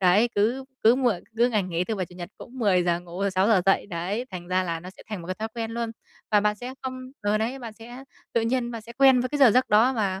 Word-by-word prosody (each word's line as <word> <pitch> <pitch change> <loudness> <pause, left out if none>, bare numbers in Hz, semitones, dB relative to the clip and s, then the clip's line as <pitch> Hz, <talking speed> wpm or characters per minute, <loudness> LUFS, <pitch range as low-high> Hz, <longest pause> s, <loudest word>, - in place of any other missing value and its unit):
đấy, 195 +6 +4
cứ 235 +6 +1 0.2
cứ 230 +2 +6
muộn 240 -9 +1
cứ 240 +2 +4
ngày 215 -4 +1
nghỉ, 180 -1 -2
thứ 220 - -2
Bảy, 185 -3 -3
Chủ 180 - -16
nhật 175 -1 -7
cũng - - -10
phải 255 - -11
10:00 180 -5 +2
ngủ 175 +1 -9
rồi 200 0 +1
6:00 190 +1 +3
dậy, 195 - +3
đấy, 195 +6 -3
thành 175 -1 -7
ra 185 0 +2
là 165 -2 -3
nó 180 - -9
sẽ - - -16
thành 210 -5 -4
một - - -10
cái 185 - -3
thói 220 +2 -4
quen 225 -1 -3
luôn. 230 0 -3 0.4
Và 210 - +5
bạn 210 0 +2
sẽ 250 +4 -7
không 260 0 -4 0.3
ờ, 205 +1 +1
đấy, 235 +5 -2
bạn 230 -3 -7
sẽ 240 +4 -11 0.3
tự 230 - +2
nhiên 240 +1 0
bạn 230 -2 -6
sẽ 235 - -11
quen 265 0 +5
với 255 - -1
cái 290 - -3
giờ 270 -4 +7
giấc 255 +4 +3
đó 225 +5 +5
và, 195 -5 -1
215 Hz, 290 wpm, -25 LUFS, 185-240 Hz, 0.4 s, giờ